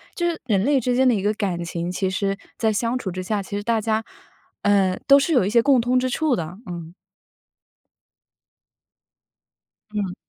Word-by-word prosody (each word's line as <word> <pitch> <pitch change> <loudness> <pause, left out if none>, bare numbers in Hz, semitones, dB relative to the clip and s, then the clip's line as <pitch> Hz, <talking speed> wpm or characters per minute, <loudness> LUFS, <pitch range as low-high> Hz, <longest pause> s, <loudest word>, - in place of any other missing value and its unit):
就 345 -1 0
是 330 - -4
人 200 -5 +1
类 280 0 +3
之 250 0 0
间 260 +1 +4
的 250 - +5
一 195 - -1
个 210 +2 +1
感 185 -5 -2
情， 170 +1 -4
其 185 +1 -1
实 195 +1 -1 0.2
在 220 -2 +1
相 235 +4 0
处 205 -6 -4
之 185 +1 -5
下， 210 +1 -1
其 195 +1 -7
实 205 - -3
大 230 0 +1
家， 220 +1 0 0.6
呃， 195 -2 +3
都 275 - +8
是 280 +4 +1
有 245 -8 +4
一 - - 0
些 235 +1 +4
共 270 0 +4
通 245 +2 +1
之 255 0 -1
处 305 0 +1
的， 170 +1 -5
嗯。 170 -2 -7 3.0
嗯。 200 -4 -2
210 Hz, 205 characters per minute, -22 LUFS, 185-250 Hz, 3.0 s, 都